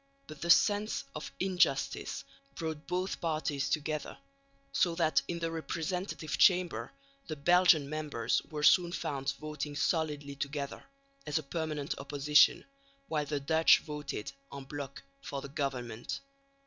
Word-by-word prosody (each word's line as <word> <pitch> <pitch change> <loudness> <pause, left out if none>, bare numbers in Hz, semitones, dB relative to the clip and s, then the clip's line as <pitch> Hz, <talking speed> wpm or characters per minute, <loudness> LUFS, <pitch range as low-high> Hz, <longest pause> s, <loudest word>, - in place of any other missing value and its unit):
But 155 - -11
the 170 - -3
sense 205 +4 +4
of 150 - -6
injustice 175 -7 +1 0.3
brought 160 -1 -5
both 185 +1 -2
parties 155 -4 -1
together, 155 -1 -2 0.5
so 170 +3 +2
that 165 -2 +3
in 170 - -2
the 165 -1 -2
representative 165 -2 -3
Chamber 180 -2 +4 0.4
the 155 - -3
Belgian 170 -1 +5
members 150 -5 -1
were 150 -1 -4
soon 175 +2 +6
found 140 -4 -2
voting 150 -1 -5
solidly 150 -3 -1
together, 140 0 -4 0.4
as 150 - +1
a 155 - -2
permanent 150 -1 -3
opposition, 145 +1 +4 0.4
while 150 -2 0
the 145 -1 -1
Dutch 160 +3 +5
voted 150 -8 -5 0.2
en 140 -1 -7
bloc 140 0 -7 0.2
for 140 - -5
the 140 - -8
government. 125 -5 -3
150 Hz, 135 wpm, -32 LUFS, 140-165 Hz, 0.5 s, soon